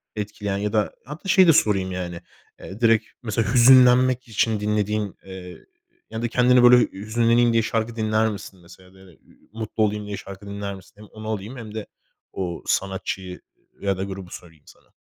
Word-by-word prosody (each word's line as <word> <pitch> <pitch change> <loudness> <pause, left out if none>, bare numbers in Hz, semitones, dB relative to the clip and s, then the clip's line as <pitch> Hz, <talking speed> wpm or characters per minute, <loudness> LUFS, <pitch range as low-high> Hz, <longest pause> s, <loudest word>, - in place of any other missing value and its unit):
etkileyen 105 -1 -4
ya 105 +2 -3
da 105 -1 0
hatta 150 +8 -8
şeyi 190 -1 +6
de 165 - +7
sorayım 95 -7 +2
yani, 90 -2 -5 0.4
eee, 100 - -10
direkt 115 -1 +4 0.2
mesela 110 -1 -1
hüzünlenmek 125 0 +6
için 110 -1 0
dinlediğin, 105 0 -1
eee, 95 -2 -10 0.4
ya 110 - -5
da 120 - 0
kendini 125 +1 +4
böyle 125 0 +8
hüzünleneyim 115 +3 +1
diye 115 0 +3
şarkı 115 +1 -2
dinler 110 0 +1
misin 100 -2 -8
mesela 90 +2 -17
da 95 - -19
ü 95 - -17
ü - - -26
mutlu 110 0 -2
olayım 105 0 -1
diye 100 -1 -5
şarkı 100 +1 -10
dinler 100 0 -5
misin? 95 - -16
Hem 105 - -13
onu 110 +1 -9
alayım 110 +4 -5
hem 110 -3 -9
de 110 - -5 0.5
o 90 -3 -4
sanatçıyı 95 -1 -3 0.4
ı - - -9
ya 100 -1 +1
da 95 - -3
grubu 95 -2 -7
sorayım 80 -4 -12
sana. - - -21
105 Hz, 185 wpm, -23 LUFS, 95-115 Hz, 0.5 s, böyle